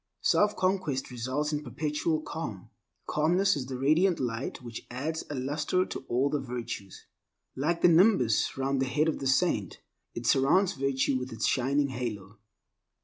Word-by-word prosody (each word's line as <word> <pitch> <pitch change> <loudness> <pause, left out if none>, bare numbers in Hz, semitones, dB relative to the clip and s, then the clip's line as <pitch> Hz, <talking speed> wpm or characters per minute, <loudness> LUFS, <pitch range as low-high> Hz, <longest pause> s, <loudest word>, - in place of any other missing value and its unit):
Self 210 0 +3
conquest 185 -9 -1
results 130 +5 -2
in 150 0 -2
perpetual 150 +4 -1
calm. 115 - -6 0.3
Calmness 180 +6 +2
is 130 -3 -4
the 130 -1 -4
radiant 160 +7 +3
light 120 0 -3
which 120 -2 -8
adds 150 +6 -3
a 145 - -4
luster 150 +7 0
to - - -7
all 130 +4 +1
the 150 - 0
virtues. 120 -6 -6 0.5
Like 165 +5 -1
the - - +8
nimbus 165 - +4
round 135 0 0
the 135 - +1
head 150 +5 +1
of 160 - -1
the 135 - -2
saint, 130 - +1 0.4
it 115 - -5
surrounds 155 - +3
virtue 135 0 0
with 125 0 -6
its 115 0 -2
shining 140 +2 +1
halo. 110 -5 -5
135 Hz, 160 wpm, -29 LUFS, 125-160 Hz, 0.5 s, the